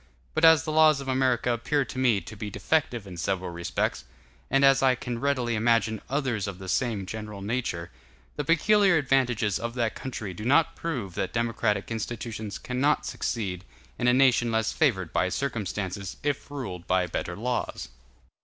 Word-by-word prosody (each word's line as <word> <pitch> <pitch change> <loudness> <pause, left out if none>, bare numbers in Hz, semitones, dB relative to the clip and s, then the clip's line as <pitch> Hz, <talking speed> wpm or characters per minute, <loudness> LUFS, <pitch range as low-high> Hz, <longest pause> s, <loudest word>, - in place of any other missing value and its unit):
But 160 - -1
as 160 -3 +7
the 155 - -3
laws 155 -2 +5
of 140 - -7
America 130 -2 +1
appear 140 +4 0
to 130 - -6
me 120 -6 +3
to 95 +6 -10
be 105 +1 -5
defective 120 +2 0
in 90 -3 -9
several 95 +1 -2
respects, 85 0 -2 0.5
and 135 +1 +4
as 135 0 +5
I 130 -1 +4
can 120 -1 -5
readily 130 -4 0
imagine 110 -1 +2
others 130 -7 -1
of 100 -2 -5
the 95 0 -9
same 110 -1 0
general 105 -1 -7
nature, 100 -7 -3 0.4
the 145 - -2
peculiar 195 +4 +4
advantages 125 -7 +1
of 120 +1 -4
that 115 -2 0
country 110 -7 -6
do 105 - -8
not 155 +7 +3
prove 125 - -4
that - - -3
democratic 115 -3 0
institutions 110 -2 -4
cannot 135 +4 0
succeed 95 -6 -3 0.4
in 120 - +1
a - - +6
nation 125 -3 +4
less 110 0 0
favored 100 - +1
by 90 +2 +2
circumstances, 100 -6 -3
if 145 -1 -2
ruled 100 -12 -6
by 90 0 +2
better 85 0 -4
laws. 120 +4 -3
120 Hz, 175 wpm, -27 LUFS, 100-135 Hz, 0.5 s, as